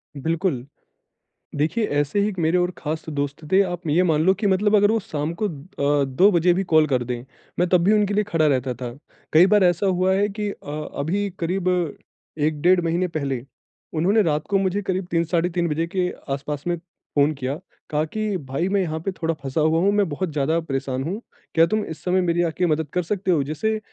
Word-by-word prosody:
बिल्कुल। 160 -2 -1 0.9
देखिए, 160 +10 +1
ऐसे 145 +3 0
ही 200 - +2
एक 195 - -7
मेरे 165 +2 +2
और 180 0 +1
ख़ास 155 +1 -4
दोस्त 145 0 -3
थे, 190 +1 +6
आप 175 -3 -3
ये 160 +5 +3
मान 160 -4 +2
लो 190 - +6
कि 205 +2 -1
मतलब 205 +2 +3
अगर 205 0 +5
वो 225 - +2
शाम 155 -4 -3
को 210 - +2
अ, 145 -3 -1
2 155 +10 +4
बजे 175 -1 +4
भी 190 +2 0
कॉल 160 -4 +4
कर 130 -4 +1
दें, 120 0 -4 0.4
मैं 180 - +3
तब 180 -2 +4
भी 200 +4 +4
उनके 205 -1 +2
लिए 210 +1 +2
खड़ा 165 -6 +1
रहता 130 -2 +1
था। 120 0 -6 0.4
कई 160 +3 +8
बार 205 -2 +5
ऐसा 175 +2 +2
हुआ 185 0 +2
है 200 +1 +2
कि 210 0 -3
अ, 150 -4 -7
अभी 195 +8 -1
करीब 180 +2 -1 0.7
1 150 0 0
डेढ़ 180 +2 +5
महीने 170 +2 0
पहले, 140 -7 -3 0.5
उन्होंने 185 +7 +3
रात 150 -3 0
को 200 - +3
मुझे 195 +1 0
करीब 190 -2 -2
3, 165 0 +2
साढ़े 170 +1 0
3 175 -1 0
बजे 160 +2 -1
के 180 +1 -1 0.2
आसपास 145 +1 -4
में 175 - +1 0.4
फ़ोन 145 +1 +4
किया। 135 +1 -4 0.3
कहा 150 0 +1
कि, 210 +3 -2
"भाई, 140 +3 -3
मैं 200 0 +2
यहाँ 160 -3 -2
पे 195 - 0
थोड़ा 165 -3 -2
फँसा 135 +2 -1
हुआ 160 +1 +3
हूँ, 200 +2 +3
मैं 205 -2 +2
बहुत 165 +4 -2
ज़्यादा 155 +3 +1
परेशान 135 -4 -3
हूँ, 190 +9 -4 0.3
क्या 165 - +6
तुम 215 +2 0
इस 160 - -8
समय 185 +1 +2
मेरी 175 -1 +1
आके 180 +3 -1
मदद 160 -2 0
कर 180 - +1
सकते 190 +2 -1
हो?" 160 -5 +3
जैसे 215 +10 -1
170 Hz, 220 wpm, -23 LUFS, 150-190 Hz, 0.9 s, कई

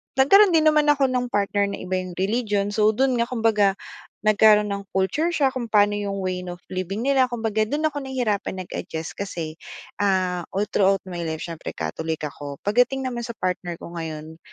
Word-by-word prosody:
nagkaroon 365 +8 +6
din 315 - +4
naman 305 -1 +4
ako 275 -3 +3
ng 250 -1 0
partner 205 -2 0
na 200 - -4
iba 185 0 -3
yung 185 -1 -7
religion, 205 +1 0
so 210 0 +3
do'n 260 0 +2
nga 235 - +1
kumbaga 220 -5 +2 0.5
nagkaroon 210 -1 +5
ng 200 -1 -7
culture 190 - 0
shock 280 -6 +1
kung 240 -3 -4
paano 205 -1 +4
yung 200 -1 -3
way 185 -1 -2
of 175 - -6 0.2
living 190 +5 -3
nila 265 -2 +3
kumbaga 225 -3 -1
do'n 300 +5 -1
ako 295 -2 -1
nahihirapan 245 -8 -2
nag-adjust 160 -1 -6
kasi, 170 -6 -5 0.5
ah, 185 -3 +1
all 200 +2 +1
throughout 195 0 +3
my 175 -2 -5
life 160 -1 -4
siyempre 165 -2 -6
Catholic 155 - -3
ako. 145 -1 -7
Pagdating 245 +5 +2
naman 245 -2 -3
sa 235 -1 -6
partner 180 -2 -3
ko 170 - -10
ngayon, 160 -1 -7
205 Hz, 185 wpm, -23 LUFS, 185-250 Hz, 0.5 s, nagkaroon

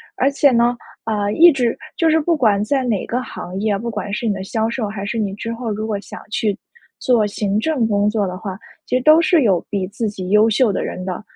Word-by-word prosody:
而 270 - +2
且 280 0 +4
呢， 240 0 +2 0.3
呃， 205 -2 -1
一 340 +6 +7
直 245 -5 0 0.2
就 330 - +3
是 320 0 +4
不 330 +1 +1
管 210 -6 +2
在 265 +4 0
哪 225 -6 -1
个 245 +2 -2
行 185 -6 -7
业， 210 -1 0
不 235 +4 -4
管 205 -2 -5
是 235 +3 -3
你 210 - +1
的 190 -1 -5
销 220 +3 -1
售 230 -2 -2
还 200 -1 -6
是 220 +3 -3
你 205 -3 -1
之 230 +3 -5
后 230 -1 -4
如 215 +1 -3
果 210 -2 -2
想 - - -10
去 210 -2 -1 0.4
做 240 -4 +2
行 205 0 -1
政 265 -1 0
工 205 -1 +2
作 210 -1 0
的 180 0 -5
话， 190 -1 -6 0.3
其 - - -1
实 - - -2
都 310 +3 +7
是 325 0 +3
有 190 -7 +2
比 195 -3 -2
自 215 +3 -3
己 185 -3 -6
优 210 +2 +5
秀 225 +1 +3
的 - - -2
人 185 - -5
的， 185 +1 -4
220 Hz, 270 characters per minute, -19 LUFS, 200-245 Hz, 0.4 s, 一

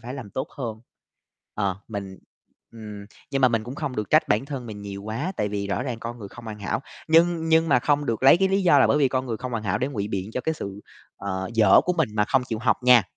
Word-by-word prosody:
phải 125 +3 -7
làm 120 -7 -8
tốt 130 - -3
hơn, 115 -4 -4 0.7
ờ, 100 -3 -1
mình 100 -3 -6 0.5
ừm, 105 -3 -9 0.2
nhưng 135 - 0
mà 130 - +7
mình 115 -2 -1
cũng 125 +3 -7
không 150 -6 -4
được 105 -2 -3
trách - - +4
bản 105 +4 +2
thân 135 -4 -5
mình 105 -2 -8
nhiều 100 -1 -7
quá 120 - -3
tại 105 - 0
vì 100 -1 -3
rõ 100 - -1
ràng 125 -4 -4
con 120 +1 -6
người 100 -3 -8
không 120 - -12
hoàn 110 -2 -7
hảo, 100 - -2 0.3
nhưng 165 0 +4
nhưng 160 0 +4
mà 140 - +5
không 145 +2 +1
được 115 0 -2
lấy 135 - +8
cái 190 +2 +2
lý 195 +1 +1
do 170 -6 +6
là - - +6
bởi 150 - +3
vì 140 - +4
con 130 0 -1
người 115 -3 -2
không 125 +3 -6
hoàn 115 - -2
hảo 95 - 0
để 130 - -1
ngụy 105 -7 -3
biện 95 +1 -3
cho 125 - -2
cái 160 +5 -1
sự, 100 -7 -7 0.4
ờ, 95 -1 -4
dở 105 -4 +6
của 180 - +1
mình 160 -7 +1
mà 105 -1 +2
không 130 +3 +2
chịu 110 - -2
học 115 0 +2
nha. 125 -3 +7
115 Hz, 275 wpm, -24 LUFS, 105-140 Hz, 0.7 s, lấy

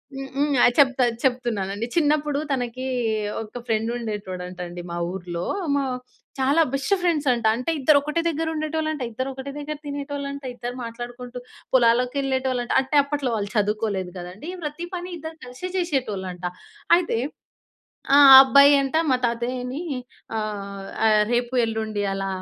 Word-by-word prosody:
హ్మ్. 270 0 -5
హ్మ్. 290 +1 +1
ఆ! - - +8
చెప్తా 260 -3 +5 0.2
చెప్తున్నానండి. 230 -5 -1
చిన్నప్పుడు 295 -2 +2
తనకి 255 -1 -2 0.6
ఒక 225 +2 -7
ఫ్రెండుండేటోడంటండి 195 -6 -3
మా 170 - -3
ఊర్లో. 175 -2 -5 0.3
మా 280 - +1 0.6
చాలా 280 +5 +3
బెస్ట్ 275 +8 0
ఫ్రెండ్స్ 320 -5 +1
అంట. 235 -1 -3
అంటే 255 +7 -2
ఇద్దరొకటే 300 +3 +3
దెగ్గరుండేటోళ్ళంట. 310 -2 -2
ఇద్దరొకటే 265 +3 -5
దెగ్గర 300 +1 -5
తినేటోళ్ళంట. 280 0 -5
ఇద్దరు 245 0 -5
మాట్లాడుకుంటూ 245 +1 -7 0.4
పొలాలకెళ్ళేటోళ్ళంట. 250 +1 +2
అంటే, 265 +3 -3
అప్పట్లో 280 -3 -2
వాళ్ళు 205 -1 -3
చదువుకోలేదు 205 -3 -1
కదండీ. 185 - -8
ప్రతీ 320 +4 -5
పని 355 0 -5
ఇద్దరు 320 +1 -8
కలిసే 255 +9 -7
చేషేటోళ్ళంట. 205 - -2 0.5
అయితే, 345 -9 -1 1.0
ఆ - - +8 0.2
అబ్బాయంట 280 +1 +6
మా 255 - +4
తాతయ్యని 250 +2 -2 0.6
ఆహ్, 200 -2 -5 0.2
ఆహ్, 215 -1 +5
"రేపు, 240 +1 0
ఎల్లుండి 220 -2 -2
అలా 195 0 -2
250 Hz, 120 wpm, -24 LUFS, 215-285 Hz, 1.0 s, ఆ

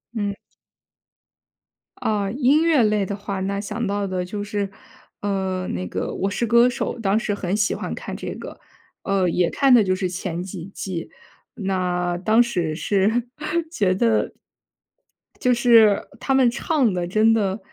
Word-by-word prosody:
嗯。 205 -2 -1 1.6
啊， 205 -2 -1
音 275 +5 +3
乐 320 -7 +4
类 210 -2 +2
的 200 - -4
话， 200 -1 -5
那 200 +1 -2
想 235 +3 -3
到 200 0 -1
的 185 -1 -2
就 205 +3 -5
是， 205 -1 -2 0.5
呃， 190 -2 -2
那 90 +1 -3
个 95 - -3
《我 195 - -1
是 220 +4 -1
歌 235 +2 +5
手》， 250 -1 -3
当 200 0 +2
时 215 -2 -2
很 190 -1 -2
喜 205 -1 +1
欢 - - -4
看 - - -6
这 - - -5
个。 - - -9 0.4
呃， 195 -2 +1
也 175 +1 +1
看 275 -2 +3
的 235 -3 +7
就 185 -1 +1
是 185 0 -1
前 175 -1 -4
几 185 -2 -7
季。 180 -4 -5 0.5
那 180 -3 -1
当 220 +5 +4
时 180 -10 0
是 210 +8 +1 0.4
觉 205 - +1
得 220 +3 +1 1.1
就 250 - +3
是， 235 -2 +6 0.2
呃， - - -18
他 270 - 0
们 260 -2 +5
唱 265 - +1
得 175 -1 -2
真 215 +4 +4
的 200 -2 0
200 Hz, 175 characters per minute, -22 LUFS, 185-230 Hz, 1.6 s, 的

